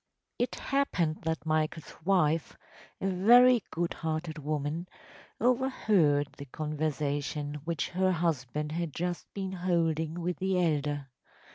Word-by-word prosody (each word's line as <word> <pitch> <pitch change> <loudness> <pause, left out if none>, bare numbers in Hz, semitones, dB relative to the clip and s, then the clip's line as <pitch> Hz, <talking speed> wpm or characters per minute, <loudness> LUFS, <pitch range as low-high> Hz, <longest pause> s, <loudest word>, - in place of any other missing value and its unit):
It 245 - 0
happened 185 - 0
that 160 0 -2
Michael’s 155 0 -1
wife, 165 -4 +2 0.4
a 195 - -1
very 235 +6 +6
good 170 +1 -1
hearted 155 0 -3
woman, 150 +3 -2 0.5
overheard 215 - +3
the 140 - -6
conversation 150 0 -2
which 165 -2 -1
her 185 +1 +2
husband 150 -4 -1
had 165 -2 -2
just 175 0 -3
been 190 -2 -3
holding 170 -3 0
with 175 +1 -2
the 190 -1 +1
elder. 145 -4 0
165 Hz, 120 wpm, -30 LUFS, 150-185 Hz, 0.5 s, very